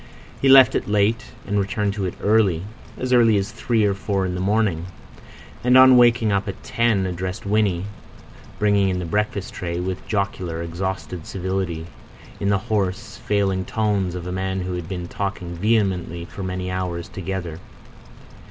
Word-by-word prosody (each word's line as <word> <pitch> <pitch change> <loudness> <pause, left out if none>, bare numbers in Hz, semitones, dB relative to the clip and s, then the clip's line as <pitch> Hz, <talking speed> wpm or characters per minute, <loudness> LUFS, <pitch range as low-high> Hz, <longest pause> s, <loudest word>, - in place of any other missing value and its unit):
He 135 - +4
left 130 -1 +8
it - - -1
late, 105 +2 +2 0.2
and 105 +1 0
returned 100 +1 -1
to 100 -2 -3
it 90 - -4
early—as 110 +4 0
early 115 -3 +5
as 100 +2 -2
three 115 0 +1
or 100 - +2
four 95 0 -1
in 90 - -2
the 90 - -3
morning; 95 -4 +1 0.8
and 125 +1 +5
on 130 0 +8
waking 120 -3 +5
up 100 +1 0
at 100 - -6
ten 115 -5 +1
addressed 90 +1 -4
Winnie, 100 -3 +1 0.7
bringing 100 -2 +3
in 90 - -1
the 90 - -3
breakfast 105 +2 -2
tray, 85 -1 -4
with 90 0 -4
jocular, 90 -5 -2
exhausted 90 0 -4
civility, 95 -3 -3 0.5
in 100 - 0
the 100 - +3
hoarse, 100 -3 -2
failing 100 -2 0
tones 100 -3 -1
of 90 -1 -6
a 90 - -4
man 95 0 -2
who 90 0 -3
had 90 -1 -5
been 90 -2 -4
talking 95 -2 -4
vehemently 95 -4 0
for 100 - -9
many 90 0 -3
hours 90 -2 -3
together. 90 -3 -5
95 Hz, 165 wpm, -22 LUFS, 90-105 Hz, 0.8 s, left